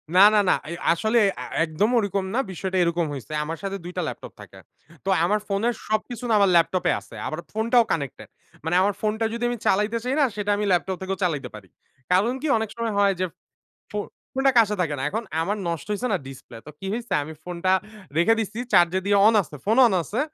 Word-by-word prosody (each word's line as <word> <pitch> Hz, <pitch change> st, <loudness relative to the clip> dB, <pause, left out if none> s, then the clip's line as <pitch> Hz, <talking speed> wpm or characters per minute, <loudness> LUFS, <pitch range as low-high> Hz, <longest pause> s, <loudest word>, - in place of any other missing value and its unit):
না, 185 Hz, -, +7 dB
না, -, -, +6 dB
না। -, -, +5 dB
এই 170 Hz, -, -4 dB, 0.2 s
আসলে 220 Hz, +7 st, +1 dB, 0.2 s
আ -, -, -4 dB, 0.2 s
একদম 165 Hz, +6 st, 0 dB
ওরকম 200 Hz, -3 st, 0 dB
না। 250 Hz, -, +1 dB
বিষয়টা 190 Hz, +1 st, -3 dB
এরকম 170 Hz, 0 st, 0 dB
হইছে। 135 Hz, 0 st, -8 dB
আমার 160 Hz, +2 st, -5 dB
সাথে 195 Hz, 0 st, -3 dB
২ 175 Hz, -, -6 dB
টা -, -, +1 dB
ল্যাপটপ -, -, -7 dB
থাকে। -, -, -13 dB, 0.5 s
তো -, -, -1 dB
আমার 210 Hz, +5 st, +2 dB
ফোনের 210 Hz, +4 st, 0 dB
সবকিছু 225 Hz, +3 st, -2 dB
না -, -, +3 dB
আমার 200 Hz, -1 st, +4 dB
ল্যাপটপ 170 Hz, +2 st, +3 dB
এ -, -, +4 dB
আছে। -, -, -15 dB
আমার -, -, -4 dB
ফোনটাও 230 Hz, +2 st, +3 dB
কানেক্টেড 140 Hz, -5 st, -3 dB, 0.4 s
মানে 160 Hz, +2 st, 0 dB
আমার 200 Hz, +2 st, +2 dB
ফোনটা 220 Hz, +1 st, 0 dB
যদি 235 Hz, +1 st, -4 dB
আমি 240 Hz, -, -2 dB
চালাইতে 210 Hz, +4 st, +2 dB
চাই 250 Hz, +1 st, -1 dB
না 290 Hz, -, +5 dB
সেটা 205 Hz, 0 st, -1 dB
আমি 210 Hz, -, -1 dB
ল্যাপটপ 185 Hz, +1 st, +1 dB
থেকেও 190 Hz, 0 st, -3 dB
চালাইতে 145 Hz, -8 st, -1 dB
পারি। 100 Hz, -3 st, -12 dB, 0.4 s
কারণ 200 Hz, +7 st, +3 dB
কি? 315 Hz, -, -2 dB
অনেক 220 Hz, -1 st, -2 dB
সময় 230 Hz, -2 st, -2 dB
হয় 200 Hz, -1 st, +4 dB
যে, 185 Hz, -, +1 dB, 0.7 s
ফো 210 Hz, -, -4 dB, 0.4 s
ফোনটা 270 Hz, +1 st, +3 dB
কাছে 210 Hz, -2 st, +3 dB
থাকে 150 Hz, -4 st, -1 dB
না। -, -, -3 dB
এখন 225 Hz, +8 st, -3 dB, 0.2 s
আমার 200 Hz, +6 st, -1 dB
নষ্ট 165 Hz, -4 st, -4 dB
হইছে 235 Hz, +5 st, -2 dB
না, -, -, +2 dB
ডিসপ্লে। 130 Hz, -3 st, -11 dB
তো -, -, -10 dB
কি 195 Hz, -, -6 dB
হইছে, 235 Hz, +1 st, -4 dB
আমি 155 Hz, +2 st, -8 dB
ফোনটা 180 Hz, +1 st, -1 dB, 0.5 s
রেখে 175 Hz, +7 st, +5 dB
দিসি। 220 Hz, +1 st, -3 dB
চার্জ 175 Hz, -1 st, +6 dB
দিয়ে 200 Hz, 0 st, +3 dB
অন 225 Hz, -, +5 dB
আছে 155 Hz, -, -11 dB
ফোন 220 Hz, +4 st, +2 dB
অন 215 Hz, -, -1 dB
আছে। 210 Hz, -, -4 dB
195 Hz, 220 wpm, -24 LUFS, 170-220 Hz, 0.7 s, না